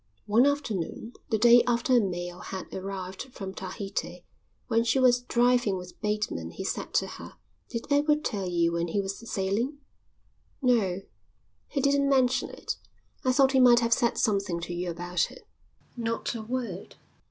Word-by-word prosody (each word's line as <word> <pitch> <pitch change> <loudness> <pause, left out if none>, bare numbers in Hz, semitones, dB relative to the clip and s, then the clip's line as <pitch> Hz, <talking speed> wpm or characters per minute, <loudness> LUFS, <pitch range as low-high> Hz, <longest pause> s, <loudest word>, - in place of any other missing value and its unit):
One 230 +6 +4
afternoon, 230 - -2 0.2
the 220 - +2
day 240 +2 +7
after 240 +2 +2
a - - +7
mail 175 -3 -3
had 190 0 -7
arrived 190 -1 -5
from 195 -5 -7
Tahiti, 190 -2 -5 0.4
when 230 0 +2
she 235 +3 +2
was 250 -1 +4
driving 245 -4 +2
with 180 0 -10
Bateman 210 - -2
he - - -7
said - - -4
to - - +3
her: - - -9 0.3
"Did 230 - -4
Edward 295 +1 +3
tell 195 -4 -2
you 170 -1 +2
when 170 0 -1
he 185 +5 -1
was 195 0 -3
sailing?" 210 +9 -1 0.8
"No, 215 -8 +2 0.7
he 275 - -2
didn't 280 0 +3
mention 260 -2 +2
it. - - -5 0.5
I 255 - +3
thought 265 0 +4
he 265 - +3
might 245 -1 +7
have 230 0 +3
said 235 0 +1
something 200 -6 +1
to 170 +1 -5
you 175 +1 -3
about 175 +1 -1
it." - - -14 0.5
"Not 230 -1 -2
a 230 - -5
word." 225 -5 -5
220 Hz, 165 wpm, -28 LUFS, 185-245 Hz, 0.8 s, day